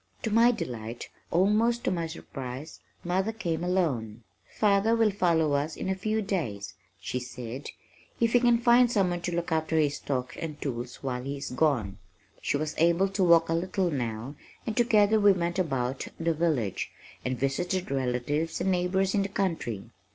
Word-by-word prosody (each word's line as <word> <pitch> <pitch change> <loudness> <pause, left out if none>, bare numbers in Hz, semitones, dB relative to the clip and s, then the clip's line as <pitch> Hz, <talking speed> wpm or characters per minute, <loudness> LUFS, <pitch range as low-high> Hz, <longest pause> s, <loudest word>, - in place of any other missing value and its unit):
To 220 - -1
my 230 +3 +6
delight, 120 - -5 0.2
almost 215 +7 +2
to - - +1
my 170 -2 -1
surprise, 135 -1 -7 0.2
mother 190 +5 0
came, 175 -7 -3
alone. 130 - -1 0.3
"Father 210 +2 +3
will 225 -2 +3
follow 165 -6 +2 0.2
in - - -4
a - - +2
few 215 +3 -1
days," 120 - -3 0.3
she 95 +7 -3
said 125 +1 -7 0.5
"if 230 -1 +2
he 245 - +6
can 240 -1 +4
find 240 +1 +5
someone 180 -5 +1
to 175 0 -2
look 170 0 -2
after 160 0 +1
his 145 -2 +2
stock 130 -2 -3
and 155 -3 -5
tools 125 -2 -5
while 125 -2 -2
he 140 +2 -4
is 135 -1 -6
gone." 125 -8 +1 0.4
She - - 0
was 155 +1 -3
able 170 +4 +4
to 195 0 0
walk 170 -2 +6
a 165 - 0
little 185 +1 0
now 120 -1 -3 0.3
and 220 - -2
together 220 -3 +4
we 205 -1 +6
went 175 0 -1
about 135 -6 -1
the 165 0 +1
village, 150 - 0 0.3
and 130 0 -2
visited 175 +7 -1
relatives 135 +4 -1
and 190 - +1
neighbors 185 +2 +1
in 205 - +2
the 195 - -2
country. 165 - -2
165 Hz, 175 wpm, -28 LUFS, 135-195 Hz, 0.5 s, my